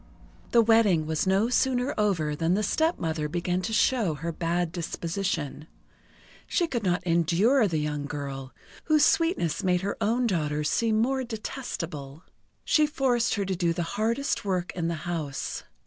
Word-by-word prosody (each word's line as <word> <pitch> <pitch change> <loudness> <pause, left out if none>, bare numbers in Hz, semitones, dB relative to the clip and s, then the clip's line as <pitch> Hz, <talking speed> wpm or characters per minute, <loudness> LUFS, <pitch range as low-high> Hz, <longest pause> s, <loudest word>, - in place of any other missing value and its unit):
The 235 -1 +5
wedding 215 -8 +4
was 160 +4 -1
no 195 +5 +3
sooner 250 +1 +1
over 170 -8 0
than 165 +4 +1
the 210 - 0
stepmother 165 - 0
began 175 +2 -1
to 185 - -3
show 220 -6 +2
her 165 +4 -4
bad 170 +1 -1
disposition. 165 -4 -3 0.8
She 350 - +1
could 250 -8 -2
not 180 -2 0
endure 180 - +3
the 165 -4 -1
young 150 -1 -2
girl, 135 -3 -5 0.3
whose 310 -2 +4
sweetness 325 - +1
made 180 -1 +2
her 200 +1 -3
own 235 +4 +1
daughters 150 -7 0
seem 225 -2 +1
more 260 +3 +1
detestable. 170 - -6 0.4
She 305 -1 +4
forced 250 -5 +1
her 200 -2 -1
to 190 0 -1
do 170 -1 +1
the 170 - -2
hardest 235 +6 0
work 185 -3 -1
in 170 -2 -2
the 170 - -1
house. 155 -6 -4
180 Hz, 160 wpm, -27 LUFS, 160-230 Hz, 0.8 s, The